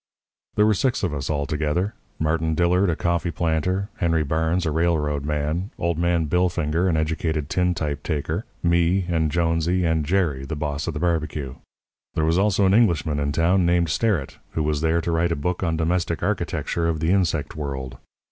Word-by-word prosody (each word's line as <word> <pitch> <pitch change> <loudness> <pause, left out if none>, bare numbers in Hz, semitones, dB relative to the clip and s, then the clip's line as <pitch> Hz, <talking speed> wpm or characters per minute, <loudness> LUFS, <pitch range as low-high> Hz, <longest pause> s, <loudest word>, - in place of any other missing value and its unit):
"There 105 - +4
were 110 - +4
six 125 +4 0
of 90 -5 0
us 70 -2 -4
all 70 -2 0
together 80 +6 -1 0.2
Martin 80 0 0
Dillard, 90 +3 +3
a 85 - +1
coffee 85 +1 0
planter; 85 +5 -1
Henry 85 -3 +1
Barnes, 80 +4 0
a 80 - 0
railroad 75 -3 0
man; 75 +6 -1
old 85 -1 -1
man 85 -1 +2
Billfinger, 85 +1 +1
an 80 - +1
educated 80 -1 -1
tintype 80 -5 0
taker; 75 -2 -2 0.2
me 85 +2 +2
and 80 -3 +1
Jonesy, 85 +2 +1
and 80 -1 +1
Jerry, 80 -5 0
the 70 +3 -4
boss 75 0 -3
of 80 - -3
the - - -2
barbecue. 75 -5 -1 0.6
There 80 - +1
was 80 +3 +2
also 100 -1 +3
an 95 - +4
Englishman 80 - +2
in 70 0 0
town 85 +5 +2
named 85 -1 +2
Sterrett, 95 -5 0
who 80 - 0
was 75 -1 0
there 80 +1 +2
to 85 - -2
write 85 +1 +1
a - - -1
book 90 +5 -2
on 80 -3 0
Domestic 85 +2 0
Architecture 85 -1 -1
of 80 -2 -1
the 80 +2 +1
Insect 90 -6 0
World. 65 -4 -5
80 Hz, 185 wpm, -23 LUFS, 75-90 Hz, 0.6 s, There